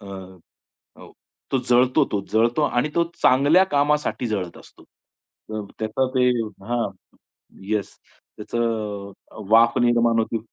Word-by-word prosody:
अ, 100 Hz, -, -13 dB
अ, 95 Hz, -2 st, -14 dB, 0.5 s
तो 135 Hz, -, +2 dB
जळतो 125 Hz, +4 st, +4 dB
तो 105 Hz, -, 0 dB
जळतो 120 Hz, +6 st, +2 dB
आणि 125 Hz, 0 st, +1 dB
तो 170 Hz, -, +3 dB, 0.2 s
चांगल्या 145 Hz, +8 st, +5 dB
कामासाठी 145 Hz, -5 st, 0 dB
जळत 95 Hz, -6 st, -3 dB
असतो. -, -, -18 dB, 0.7 s
त 110 Hz, -1 st, -4 dB
त्याचा 110 Hz, +4 st, -1 dB
ते 125 Hz, 0 st, +4 dB, 0.4 s
हां, 120 Hz, 0 st, -1 dB, 0.8 s
येस. 105 Hz, -2 st, -2 dB, 0.4 s
त्याचं 105 Hz, -3 st, -3 dB, 0.2 s
अ, -, -, -15 dB
वाफ 115 Hz, +1 st, +5 dB
निर्माण 120 Hz, -1 st, +3 dB
होते 115 Hz, +1 st, -1 dB
115 Hz, 125 wpm, -22 LUFS, 105-130 Hz, 0.8 s, चांगल्या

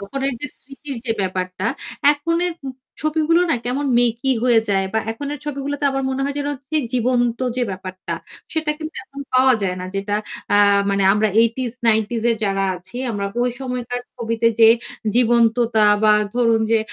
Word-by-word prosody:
তখন 235 Hz, +8 st, -6 dB, 0.2 s
যে -, -, -1 dB
স্মৃতির 275 Hz, +1 st, -9 dB
যে 225 Hz, -, +2 dB
ব্যাপারটা 185 Hz, +1 st, -2 dB, 0.5 s
এখননের 335 Hz, +4 st, -1 dB, 0.5 s
ছবিগুলো 315 Hz, +2 st, +2 dB
না -, -, +4 dB
কেমন 270 Hz, +4 st, -1 dB
মেকি 240 Hz, +2 st, +1 dB
হয়ে 240 Hz, -3 st, +5 dB
যায় 195 Hz, -1 st, +1 dB
বা -, -, +3 dB
এখননের 285 Hz, +6 st, -5 dB
ছবিগুলোতে 285 Hz, 0 st, -3 dB
আমার 270 Hz, 0 st, -2 dB
মনে 265 Hz, +1 st, -2 dB
হয় 280 Hz, 0 st, -2 dB
যেন 285 Hz, 0 st, -2 dB, 0.4 s
জীবন্ত 245 Hz, -1 st, +1 dB, 0.2 s
যে 255 Hz, -, 0 dB
ব্যাপারটা, 185 Hz, 0 st, -6 dB, 0.4 s
সেটা 315 Hz, -1 st, 0 dB
কিন্তু 315 Hz, 0 st, -7 dB
এখন 275 Hz, +1 st, -10 dB
পাওয়া 255 Hz, 0 st, +6 dB
যায় 185 Hz, -2 st, -1 dB
না। -, -, -5 dB
যেটা 200 Hz, +1 st, -2 dB, 0.4 s
আ -, -, +6 dB, 0.3 s
মানে 200 Hz, 0 st, +1 dB
আমরা 210 Hz, +1 st, +2 dB
8 230 Hz, 0 st, +3 dB, 0.6 s
টিস 235 Hz, -2 st, -3 dB, 0.2 s
যারা 195 Hz, -1 st, 0 dB
আছি 180 Hz, +7 st, -12 dB
আমরা 200 Hz, -2 st, -2 dB, 0.2 s
ওই 245 Hz, -, +1 dB
সময়কার 245 Hz, -1 st, -4 dB, 0.2 s
ছবিতে 230 Hz, -1 st, -1 dB
যে 225 Hz, -, +9 dB, 0.5 s
জীবন্ততা 235 Hz, -2 st, +3 dB, 0.2 s
বা 215 Hz, -1 st, +6 dB, 0.2 s
ধরুন 230 Hz, -2 st, +3 dB
যে 225 Hz, -, +4 dB
240 Hz, 160 wpm, -20 LUFS, 215-275 Hz, 0.6 s, যে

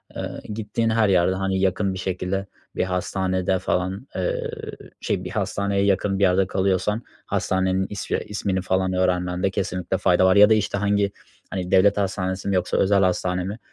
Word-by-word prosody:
Eee, -, -, -4 dB, 0.3 s
gittiğin 110 Hz, +1 st, -1 dB
her 110 Hz, -2 st, +3 dB
yerde, 95 Hz, 0 st, +3 dB
hani, 95 Hz, 0 st, -1 dB
yakın 95 Hz, +1 st, +1 dB
bir 95 Hz, -, -6 dB
şekilde 95 Hz, +1 st, -2 dB, 0.3 s
bir -, -, +1 dB
hastanede 95 Hz, 0 st, -1 dB
falan, 95 Hz, +8 st, -2 dB
eee, 90 Hz, -1 st, -2 dB, 0.5 s
şey -, -, -1 dB
bir -, -, -5 dB
hastaneye 100 Hz, 0 st, 0 dB
yakın 100 Hz, 0 st, +1 dB
bir -, -, +2 dB
yerde 95 Hz, 0 st, +3 dB
kalıyorsan 95 Hz, +3 st, 0 dB, 0.2 s
hastanenin 95 Hz, 0 st, 0 dB
ismi 100 Hz, -, -2 dB
ismini 100 Hz, -2 st, -2 dB
falan 95 Hz, 0 st, 0 dB
öğrenmende 90 Hz, 0 st, 0 dB
kesinlikle 90 Hz, -1 st, -2 dB
fayda 90 Hz, +1 st, +3 dB
var. 95 Hz, -, +5 dB
Ya 105 Hz, +1 st, +8 dB
da, -, -, +6 dB
işte, 105 Hz, -2 st, 0 dB
hangi, 100 Hz, 0 st, +1 dB, 0.4 s
hani, 90 Hz, -1 st, -4 dB
devlet 100 Hz, +2 st, +5 dB
hastanesi 95 Hz, -1 st, -2 dB
mi 100 Hz, -, +1 dB
yoksa 90 Hz, -1 st, 0 dB
özel 100 Hz, 0 st, +3 dB
hastane 90 Hz, 0 st, 0 dB
mi 100 Hz, +5 st, -5 dB
95 Hz, 170 wpm, -23 LUFS, 95-100 Hz, 0.5 s, Ya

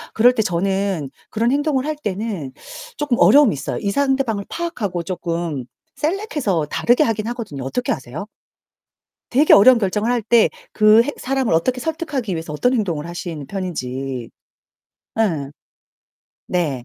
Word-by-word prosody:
그럴 245 Hz, +3 st, +6 dB
때 225 Hz, -, +1 dB
저는 190 Hz, -5 st, -1 dB, 0.2 s
그런 230 Hz, +3 st, +1 dB
행동을 285 Hz, -2 st, +1 dB
할 310 Hz, 0 st, -2 dB
때는 205 Hz, -, -4 dB, 0.5 s
조금 285 Hz, -5 st, 0 dB
어려움이 285 Hz, -6 st, +6 dB
있어요. 140 Hz, 0 st, -4 dB
이 200 Hz, -, -1 dB
상대방을 265 Hz, -5 st, 0 dB
파악하고 215 Hz, -, -3 dB
쪼끔 170 Hz, -6 st, -3 dB, 0.3 s
셀렉해서 295 Hz, -, -1 dB
다르게 245 Hz, +6 st, +3 dB
하긴 220 Hz, -3 st, -1 dB
하거든요. 225 Hz, -, -5 dB
어떻게 235 Hz, -, -2 dB
하세요? 135 Hz, +6 st, -5 dB, 1.1 s
되게 285 Hz, +5 st, +4 dB
어려운 240 Hz, +4 st, +7 dB
결정을 210 Hz, +2 st, 0 dB
할 245 Hz, -2 st, +1 dB
때 225 Hz, +1 st, +4 dB, 0.2 s
그 215 Hz, +1 st, +6 dB
해 275 Hz, -, -2 dB
사람을 260 Hz, -8 st, 0 dB
어떻게 250 Hz, +10 st, +1 dB
설득하기 300 Hz, -, -3 dB
위해서 160 Hz, -2 st, -4 dB
어떤 245 Hz, -, +1 dB
행동을 170 Hz, -9 st, -1 dB
하시는 170 Hz, -4 st, -6 dB
편인지 135 Hz, -, -4 dB, 0.9 s
예. 160 Hz, -11 st, 0 dB, 1.0 s
네. 145 Hz, -9 st, -1 dB
210 Hz, 320 characters per minute, -20 LUFS, 165-250 Hz, 1.1 s, 어려운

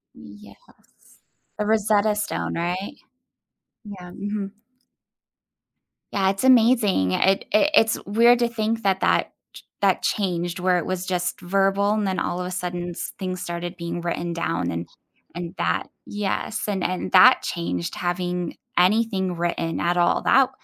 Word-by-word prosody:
Yes, 100 Hz, -1 st, -14 dB, 1.0 s
the 210 Hz, -, -1 dB
Rosetta 215 Hz, -1 st, +2 dB
Stone, 210 Hz, -, -3 dB
right? 180 Hz, -, -3 dB, 0.9 s
Yeah, 190 Hz, -4 st, -10 dB
mhm. 200 Hz, +1 st, -4 dB, 1.6 s
Yeah, 190 Hz, -1 st, +1 dB
it's 195 Hz, +3 st, -2 dB
amazing, 230 Hz, -, +4 dB
it 190 Hz, -, +2 dB
it 295 Hz, +8 st, +3 dB
it's 225 Hz, -6 st, +3 dB
weird 235 Hz, +4 st, +4 dB
to 240 Hz, -, +2 dB
think 225 Hz, 0 st, -2 dB
that 190 Hz, -1 st, +2 dB
that -, -, +2 dB, 0.2 s
ch -, -, -13 dB, 0.2 s
that -, -, +2 dB
changed 175 Hz, -3 st, -1 dB
where 180 Hz, 0 st, +2 dB
it 175 Hz, -, -2 dB
was 185 Hz, -1 st, -3 dB
just 180 Hz, -1 st, -2 dB
verbal 195 Hz, +2 st, +1 dB
and 215 Hz, -1 st, 0 dB
then 190 Hz, -1 st, -1 dB
all 175 Hz, -, -2 dB
of 180 Hz, -, -3 dB
a 180 Hz, -, -5 dB
sudden 175 Hz, -1 st, -4 dB
s 170 Hz, -, -6 dB
things 185 Hz, -2 st, -4 dB
started 175 Hz, +1 st, -5 dB
being 170 Hz, 0 st, -4 dB
written 170 Hz, 0 st, -3 dB
down 90 Hz, -, -2 dB
and 85 Hz, +1 st, -4 dB, 0.5 s
and 175 Hz, +1 st, -6 dB
that -, -, -1 dB, 0.2 s
yes, 210 Hz, +1 st, -3 dB
and 195 Hz, -3 st, -2 dB
and 180 Hz, -, -2 dB
that -, -, +7 dB
changed 85 Hz, 0 st, -3 dB
having 175 Hz, -1 st, -2 dB, 0.2 s
anything 190 Hz, -1 st, +2 dB
written 170 Hz, -1 st, -2 dB
at 175 Hz, +1 st, 0 dB
all, 175 Hz, 0 st, +2 dB
that 265 Hz, -1 st, +4 dB
185 Hz, 150 wpm, -23 LUFS, 175-210 Hz, 1.6 s, that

